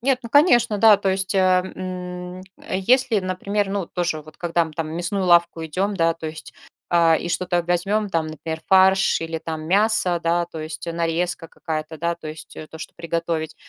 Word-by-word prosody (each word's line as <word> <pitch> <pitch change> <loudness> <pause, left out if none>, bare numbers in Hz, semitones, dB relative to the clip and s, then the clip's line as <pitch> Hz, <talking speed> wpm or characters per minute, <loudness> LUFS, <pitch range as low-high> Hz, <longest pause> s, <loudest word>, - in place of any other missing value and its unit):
Нет, 255 +1 +1
ну 235 - -8
конечно, 240 - +4
да, 220 -1 +7
то 195 -1 0
есть, 190 +1 -1
э, - - +3
м, 180 -1 -1 0.2
э, 185 - -4
если, 240 +2 +3
например, 195 +2 -2
ну 195 -2 -2
тоже 170 -4 -2
вот 155 0 -16
когда 170 -1 +1
мы 160 - -9
там 160 +1 -3
в - - -7
мясную 175 +4 -2
лавку 170 -1 +3
идем, 190 +6 -1
да, 165 -1 +2
то 165 -1 -7
есть, 155 0 -8 0.3
а, 170 -1 +4
и - - -4
что-то 175 0 0
возьмем 195 +5 0
там, 165 -4 -1
например, 160 +1 -6
фарш 190 0 +4
или 165 0 -4
там 160 -1 -6
мясо, 200 -2 +2
да, 170 +1 +1
то 165 -2 -8
есть 155 +1 -6
нарезка 170 +1 -2
какая-то, 155 0 -5
да, 170 +1 -1
то 170 -2 -11
есть, 155 +1 -10
э, 155 - -8
то, 160 - -11
что - - -8
приготовить. 165 -1 -3
175 Hz, 200 wpm, -22 LUFS, 165-190 Hz, 0.3 s, да